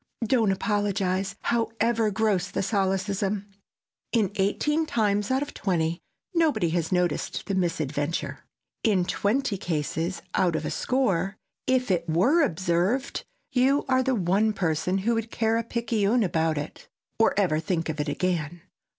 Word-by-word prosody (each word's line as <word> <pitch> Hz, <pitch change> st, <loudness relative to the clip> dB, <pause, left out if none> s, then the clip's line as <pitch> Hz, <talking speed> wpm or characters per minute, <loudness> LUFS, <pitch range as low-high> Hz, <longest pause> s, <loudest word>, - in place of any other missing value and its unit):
Don't 225 Hz, -3 st, +3 dB
apologize, 195 Hz, -1 st, 0 dB
however 230 Hz, -1 st, +1 dB
gross 205 Hz, -3 st, +1 dB
the 200 Hz, -, -2 dB
solecism! 195 Hz, 0 st, 0 dB, 0.7 s
In 215 Hz, -5 st, +2 dB
eighteen 295 Hz, +11 st, +1 dB
times 210 Hz, -4 st, +1 dB
out 265 Hz, +2 st, +2 dB
of 290 Hz, -, -8 dB
twenty, 170 Hz, -3 st, -1 dB, 0.3 s
nobody 315 Hz, -, +2 dB
has 165 Hz, -1 st, -1 dB
noticed 180 Hz, -3 st, 0 dB
the 200 Hz, -, -2 dB
misadventure. 160 Hz, -4 st, -1 dB, 0.4 s
In 195 Hz, -6 st, +3 dB
twenty 205 Hz, +2 st, 0 dB
cases 165 Hz, +2 st, -2 dB
out 175 Hz, -3 st, +2 dB
of -, -, -2 dB
a -, -, -2 dB
score, 195 Hz, -7 st, 0 dB, 0.3 s
if 255 Hz, -4 st, +2 dB
it 170 Hz, -2 st, 0 dB
were 240 Hz, -, +4 dB
observed 185 Hz, -, 0 dB, 0.3 s
you 270 Hz, +2 st, +3 dB
are 260 Hz, -1 st, +3 dB
the 260 Hz, 0 st, +1 dB
one 200 Hz, +3 st, +2 dB
person 180 Hz, 0 st, 0 dB
who 220 Hz, +5 st, +1 dB
would 225 Hz, 0 st, -2 dB
care 225 Hz, 0 st, +1 dB
a 230 Hz, -, 0 dB
picayune 230 Hz, -1 st, +1 dB
about 160 Hz, -4 st, +1 dB
it, 145 Hz, +1 st, -6 dB, 0.3 s
or 225 Hz, -, +4 dB
ever 165 Hz, -6 st, +2 dB
think 165 Hz, 0 st, -1 dB
of 155 Hz, -2 st, -4 dB
it 150 Hz, 0 st, -1 dB
again. 170 Hz, 0 st, -2 dB
195 Hz, 145 wpm, -26 LUFS, 175-230 Hz, 0.7 s, were